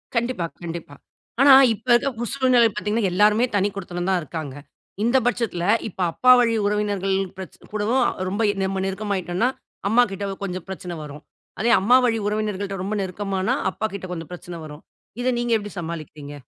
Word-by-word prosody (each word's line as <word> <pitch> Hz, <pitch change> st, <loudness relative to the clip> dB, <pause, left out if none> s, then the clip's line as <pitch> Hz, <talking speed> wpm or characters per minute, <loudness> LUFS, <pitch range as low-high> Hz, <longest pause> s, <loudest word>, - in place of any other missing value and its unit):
கண்டிப்பா, 235 Hz, -6 st, 0 dB, 0.2 s
கண்டிப்பா. 165 Hz, -4 st, -7 dB, 0.5 s
ஆனா 275 Hz, 0 st, +8 dB, 0.2 s
இப்ப 225 Hz, +4 st, -12 dB
இருக்க 240 Hz, +3 st, +3 dB
பு -, -, -1 dB
சூழ்நிலை 255 Hz, -3 st, +4 dB
பார்த்தீங்கன்னா 210 Hz, -1 st, 0 dB
எல்லாருமே 210 Hz, +5 st, +4 dB
தனி 200 Hz, 0 st, +3 dB
குடித்தனம் 175 Hz, -1 st, -4 dB
தான் 190 Hz, -1 st, +2 dB
இருக்காங்க. 155 Hz, -3 st, -6 dB, 0.5 s
இந்த 240 Hz, +3 st, +3 dB
பட்சத்தில, 230 Hz, -8 st, -1 dB, 0.3 s
இப்ப 190 Hz, -, -8 dB
அப்பா 255 Hz, +9 st, +4 dB
வழி 230 Hz, -2 st, +3 dB
உறவினர்கள் 205 Hz, -2 st, 0 dB, 0.2 s
பிரச் 190 Hz, -2 st, -9 dB
கூடவும் 215 Hz, +5 st, +1 dB
அ -, -, +2 dB, 0.2 s
ரொம்ப 200 Hz, +4 st, -2 dB
எ -, -, -6 dB
நம்ம 190 Hz, 0 st, -1 dB
நெருக்கமாயிட்டோன்னா 195 Hz, +2 st, -1 dB, 0.4 s
அம்மாகிட்ட 205 Hz, -4 st, +2 dB, 0.2 s
கொஞ்சம் 185 Hz, -2 st, -4 dB
பிரச்சனை 180 Hz, -1 st, -6 dB
வரும். 150 Hz, 0 st, -10 dB, 0.4 s
அதே 235 Hz, +3 st, +2 dB
அம்மா 235 Hz, +6 st, +5 dB
வழி 230 Hz, -2 st, +2 dB
உறவினர்கள்ட்ட 205 Hz, -2 st, -2 dB
ரொம்ப 205 Hz, +3 st, -2 dB
நெருக்கமானா, 190 Hz, 0 st, -2 dB, 0.2 s
அப்பாகிட்ட 200 Hz, -3 st, -4 dB
கொஞ்சம் 165 Hz, -1 st, -7 dB
பிரச்சனை 175 Hz, 0 st, -8 dB
வரும். 150 Hz, 0 st, -11 dB, 0.4 s
இதை 255 Hz, +1 st, +1 dB
நீங்க 240 Hz, 0 st, -1 dB
எப்படி 205 Hz, -1 st, -7 dB
சமாளிக்கிறீங்க? 155 Hz, -3 st, -7 dB
200 Hz, 160 wpm, -23 LUFS, 180-225 Hz, 0.5 s, ஆனா